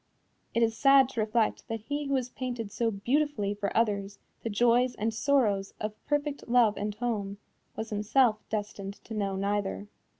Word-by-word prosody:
It 230 - +4
is 225 -1 +1
sad 275 -1 +6
to 255 - -5
reflect 220 +1 0
that 225 -1 -4
he 290 +6 -3
who 275 - +1
has 255 -2 -1
painted 245 -5 -5
so 230 +2 0
beautifully 225 0 0
for 205 -1 -2
others 200 -3 0 0.2
the 230 - -3
joys 240 +3 +3
and 220 +2 -1
sorrows 220 -6 +1
of 215 0 -3
perfect 290 -1 -1
love 235 -4 +5
and 210 0 -3
home, 210 -4 -2 0.4
was 220 0 -5
himself 215 +2 +3
destined 205 -2 -4
to 225 - -8
know 200 -2 -1
neither. 200 +1 -2
225 Hz, 170 wpm, -29 LUFS, 205-250 Hz, 0.4 s, sad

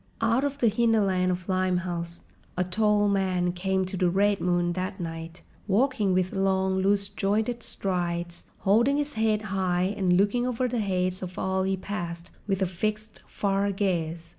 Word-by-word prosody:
Out 230 +3 +2
of 285 -1 -1
the 245 - +2
hinterland 205 -5 +2
of 180 0 -4
Limehouse, 180 -2 -1 0.3
a 180 - +2
tall 210 +3 +2
man 185 -3 +1
came 190 +1 -1
to 185 - -5
the 180 -1 +2
Red 200 +2 +2
Moon 175 -1 +1
that 185 +2 -4
night, 165 0 -6 0.2
walking 215 0 +2
with 185 +1 +1
long, 190 -1 +1
loose 200 +1 +2
jointed 215 +5 -1
strides, 175 -4 -2 0.2
holding 235 +8 +3
his 295 0 -2
head 220 -1 +1
high 185 0 +1
and 180 -3 +2
looking 205 +6 +2
over 250 0 0
the 245 -1 -2
heads 185 -2 -1
of 185 -1 -7
all 190 0 0
he 190 0 0
passed 175 -3 -5 0.2
with 195 -1 +1
a - - +3
fixed, 215 +4 -4
far 200 0 0
gaze. 170 -4 -2
190 Hz, 165 wpm, -27 LUFS, 180-210 Hz, 0.3 s, holding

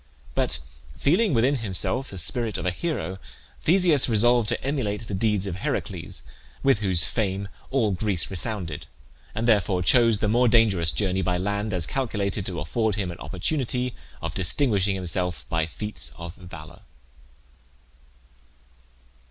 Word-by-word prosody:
But - - 0 0.4
feeling 185 +8 +2
within 130 +3 +3
himself 115 +4 -1
the 95 - -7
spirit 110 +6 +2
of - - -5
a 90 - +2
hero, 95 - -3 0.4
Theseus 170 -6 +4
resolved 120 0 +3
to - - -1
emulate 115 -7 -2
the - - -5
deeds 105 0 +1
of 95 -3 -4
Heracles, - - -4 0.4
with 135 -6 +4
whose 95 -5 +4
fame 100 -2 -1 0.2
all 125 -6 +1
Greece 95 -2 -1
resounded, 90 -4 -3 0.5
and 115 +2 -1
therefore 100 -5 +2
chose 115 +4 +5
the 105 - -1
more 120 +4 +3
dangerous 105 -8 +3
journey 95 +6 0
by 90 0 0
land, 100 +3 -2
as 90 -4 0
calculated 105 -6 -2
to 90 -4 -4
afford 110 +7 -1
him 95 -4 -2
an 85 - -10
opportunity 125 - -2 0.3
of - - -3
distinguishing 100 - +2
himself 90 -1 -2
by 80 -1 0
feats 105 +6 -2
of 85 0 -7
valour. 85 -5 -12
105 Hz, 145 wpm, -25 LUFS, 90-120 Hz, 0.5 s, chose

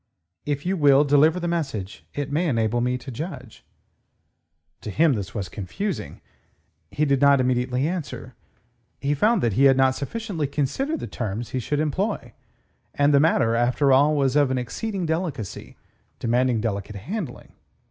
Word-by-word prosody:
"If 145 +1 -2
you 190 +2 +1
will 145 -4 +5
deliver 150 +4 +4
the 175 - -3
message, 135 - -3
it 145 -1 -3
may 165 +4 +1
enable 115 -3 +1
me 125 +1 0
to 130 +1 -9
judge." 130 - -7 1.2
To - - -6
him, 155 +7 +3
this 100 -4 -5
was 100 -4 -3
confusing. 105 - -5 0.7
He 150 - 0
did 140 -2 +1
not 140 -1 +6
immediately 125 +2 +1
answer. 170 -4 -5 0.7
He 140 +2 0
found 210 +7 +2
that 115 -4 +1
he 135 +7 +4
had 135 -1 +6
not 130 0 +4
sufficiently 170 - -3
considered 265 - -2
the - - -3
terms 110 0 -4
he 130 - -2
should 145 +4 -2
employ, 155 - -2 0.6
and 145 +1 +3
the 140 - +6
matter, 130 -7 +3
after 125 +4 +2
all, 145 +3 +4
was 135 -2 +1
of 145 -2 +4
an 130 - 0
exceeding 185 - -3
delicacy, 160 - -4 0.4
demanding 120 -1 +1
delicate 105 -2 -3
handling. 175 - -6
140 Hz, 160 wpm, -24 LUFS, 120-155 Hz, 1.2 s, not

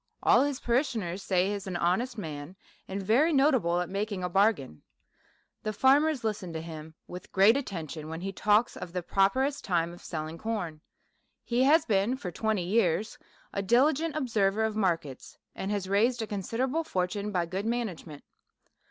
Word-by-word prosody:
All - - +6
his 280 -1 0
parishioners 230 - -1
say 185 -1 +1
he - - -1
is 200 -1 -5
an 185 - -4
honest 210 +9 0
man, 155 -2 -6 0.3
and 195 +1 -4
very 250 - +3
notable 260 - +3
at 180 - -3
making 200 0 -3
a 180 - -1
bargain. 185 - +1 0.8
The 215 - -3
farmers 275 +4 +3
listen 205 -5 -3
to 160 - -3
him 160 -1 -9
with 180 +1 -10
great 200 +5 +6
attention, 165 - -5
when 160 +1 -5
he 195 +1 -3
talks 210 +4 +2
of 175 -1 -8
the 180 -1 -2
proper 195 +8 +2
est 285 +1 -2
time 170 -2 0
of 175 - -13
selling 160 0 -5
corn. 180 -9 -4 0.6
He 240 +1 0
has 315 +3 +5
been 210 +4 +1
for 180 -9 -6
twenty 215 0 -1
years 205 +1 +1 0.3
a 200 - -1
diligent 285 +9 +2
observer 220 -7 +1
of 220 -1 -1
markets, 165 -10 -2 0.2
and 190 - -4
has 200 -2 -2
raised 225 +5 +2
a - - -2
considerable 235 - -2
fortune 200 - -2
by 180 -3 0
good 190 +5 -4
management. 190 -11 -4
200 Hz, 175 wpm, -29 LUFS, 175-235 Hz, 0.8 s, All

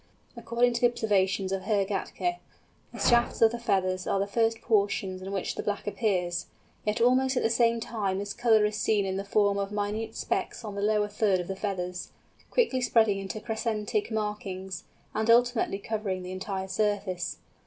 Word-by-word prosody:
According 235 +1 +1
to 235 - -2
the 245 - +7
observations 195 -5 +1
of 195 -1 -1
Herr 200 0 +1
Gätke, 350 - -2 0.5
the - - -10
shafts 240 0 +3
of 225 -1 +6
the 235 - -4
feathers 190 -5 0
are 195 - +1
the 200 - +1
first 225 +2 +1
portions 200 -4 0
in 190 +1 -6
which 195 -2 -2
the - - -4
black 205 -1 -3
appears; 190 -4 -1 0.4
yet 210 - +1
almost 255 +2 +3
at - - +1
the 225 - +2
same 230 0 +3
time 205 -4 -2
this 200 +1 -4
colour 220 -3 +4
is 210 0 -1
seen 210 -2 +2
in 190 0 -2
the 195 - -2
form 200 0 +2
of 200 0 -2
minute 210 +2 -2
specks - - -2
on 210 - -5
the 200 - -4
lower 210 0 +2
third 205 -2 +1
of 175 - -4
the 195 - -3
feathers, 180 -3 -3 0.4
quickly 365 - +2
spreading 220 -5 +3
into 195 +2 -5
crescentic 225 - -2
markings, 200 -4 -4 0.3
and 220 +1 -1
ultimately 240 -3 +4
covering 200 -3 -3
the 180 - -6
entire 190 0 -4
surface. 195 -2 -1
210 Hz, 185 wpm, -28 LUFS, 195-225 Hz, 0.5 s, the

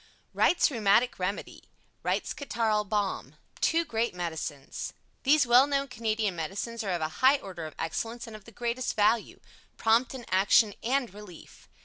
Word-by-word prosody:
Wright's 345 - +3
Rheumatic 230 0 +2
Remedy 185 +3 -4 0.4
Wright's - - -1
Catarrhal 225 -7 0
Balm 205 -2 -2 0.2
Two 330 +1 +2
Great 230 - -1
Medicines 160 -5 -5 0.3
These 285 +1 +4
well 250 +3 +6
known 280 -1 0
Canadian 220 -4 -1
Medicines 200 +8 -4
are 200 - -3
of 175 -3 -1
a 155 - -1
high 265 +2 +6
order 180 - -7
of 155 - -12
excellence 225 +8 -3
and 225 -2 -10
of 215 - -12
the 230 - -13
greatest 240 +3 -2
value. 220 +1 +2 0.4
Prompt 230 +4 +2
in 245 -3 -8
action 200 +3 +4
and 250 -2 0
relief. 205 -5 -13
225 Hz, 155 wpm, -28 LUFS, 195-245 Hz, 0.4 s, well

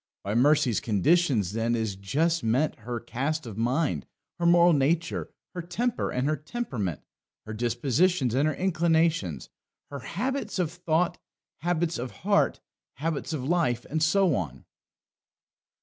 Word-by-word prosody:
By 100 - -2
Mercy's 135 -1 +3
conditions, 115 - +2
then, 115 +1 0
is 110 -4 -2
just 155 - 0
meant 125 +7 +1
her 120 +2 -4
cast 145 +6 -3
of 110 -4 -7
mind, 120 - 0 0.3
her 170 - +2
moral 175 0 +6
nature, 155 +4 0 0.2
her 180 - -4
temper 235 +8 -1
and 125 +2 -1
her 155 - +2
temperament, 140 - -4 0.4
her 110 - -6
dispositions 125 - +1
and 140 +4 +2
her 155 - 0
inclinations, 165 - +1 0.4
her 140 - -5
habits 220 - -3
of 175 -4 0
thought, 175 0 0 0.4
habits 170 -1 0
of 125 +1 -3 0.2
heart, 205 0 +3 0.4
habits 155 +2 -3
of 150 -5 -3
life, 155 -8 +1
and 160 +1 0
so 180 +2 +3
on. 70 - -4
150 Hz, 140 wpm, -27 LUFS, 120-170 Hz, 0.4 s, moral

